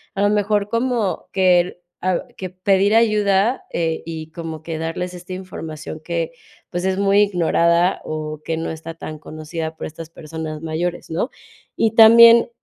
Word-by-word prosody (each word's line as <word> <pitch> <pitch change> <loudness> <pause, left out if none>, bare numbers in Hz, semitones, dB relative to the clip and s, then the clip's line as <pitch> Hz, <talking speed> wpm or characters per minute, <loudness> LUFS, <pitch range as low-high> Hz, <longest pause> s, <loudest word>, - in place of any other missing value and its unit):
a 195 - -1
lo 205 - +4
mejor 205 0 +1
como 230 -3 -1
que, 180 -2 +2 0.2
ah, 185 -1 0
que 185 - -5
pedir 195 +3 +2
ayuda, 210 +1 +2
eh, 165 -1 -1
y 160 -1 -7
como 160 -2 -7
que 160 -1 -4
darles 165 +3 -4
esta 180 +1 -8
información 160 -4 -7
que, 165 0 -3 0.4
pues, 175 +1 -3
es 190 0 0
muy 200 0 +3
ignorada, 175 -2 +2
o, 155 -1 -5
que 165 - -1
no 165 +1 -3
está 160 +1 -7
tan 155 -1 -8
conocida 160 +1 -6
por - - -6
estas 160 +1 -10
personas 155 -1 -7
mayores, 165 +2 -3
¿no? 165 +10 -1 0.5
Y 225 - +2
también, 230 +1 +8
175 Hz, 160 wpm, -20 LUFS, 160-200 Hz, 0.5 s, también